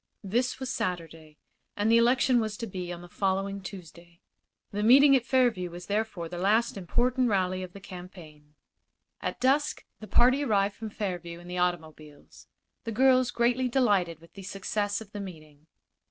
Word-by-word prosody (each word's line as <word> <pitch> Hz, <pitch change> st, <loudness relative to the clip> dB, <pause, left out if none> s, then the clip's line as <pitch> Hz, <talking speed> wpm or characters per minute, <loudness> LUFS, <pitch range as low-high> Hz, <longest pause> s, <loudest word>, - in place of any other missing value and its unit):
This 245 Hz, +6 st, -1 dB
was 260 Hz, -1 st, -4 dB
Saturday, 165 Hz, -3 st, -4 dB, 0.4 s
and 210 Hz, +2 st, +2 dB
the 230 Hz, -, +6 dB
election 245 Hz, +1 st, +4 dB
was 215 Hz, -1 st, -3 dB
to 230 Hz, -, -4 dB
be 180 Hz, -4 st, -6 dB
on 175 Hz, 0 st, -7 dB
the -, -, -10 dB
following 195 Hz, +2 st, -1 dB
Tuesday. 170 Hz, -2 st, -11 dB, 0.5 s
The 205 Hz, -, -2 dB
meeting 275 Hz, +5 st, +7 dB
at 255 Hz, -1 st, 0 dB
Fairview 240 Hz, -9 st, +2 dB
was 175 Hz, +1 st, -9 dB
therefore 205 Hz, -4 st, -2 dB
the 175 Hz, +1 st, -6 dB
last 215 Hz, +5 st, +2 dB
important 245 Hz, +6 st, +1 dB
rally 185 Hz, -2 st, 0 dB
of 180 Hz, -1 st, -8 dB
the 200 Hz, -, -10 dB
campaign. 175 Hz, -6 st, -12 dB, 0.7 s
At -, -, -4 dB
dusk 275 Hz, +3 st, +1 dB
the 215 Hz, -, -9 dB
party 255 Hz, +6 st, +4 dB
arrived 205 Hz, -5 st, +1 dB
from 220 Hz, +1 st, -7 dB
Fairview 175 Hz, -5 st, -5 dB
in 175 Hz, -, -13 dB
the 180 Hz, 0 st, -4 dB
automobiles, 155 Hz, -4 st, -4 dB, 0.4 s
the 230 Hz, -, -4 dB
girls 255 Hz, +1 st, +4 dB
greatly 245 Hz, +2 st, +1 dB
delighted 200 Hz, -, +1 dB
with 165 Hz, -, -18 dB
the 195 Hz, -, -10 dB
success 205 Hz, +2 st, -2 dB
of 210 Hz, -2 st, -12 dB
the 205 Hz, -, -6 dB
meeting. 155 Hz, -5 st, -11 dB
195 Hz, 170 wpm, -28 LUFS, 175-235 Hz, 0.7 s, meeting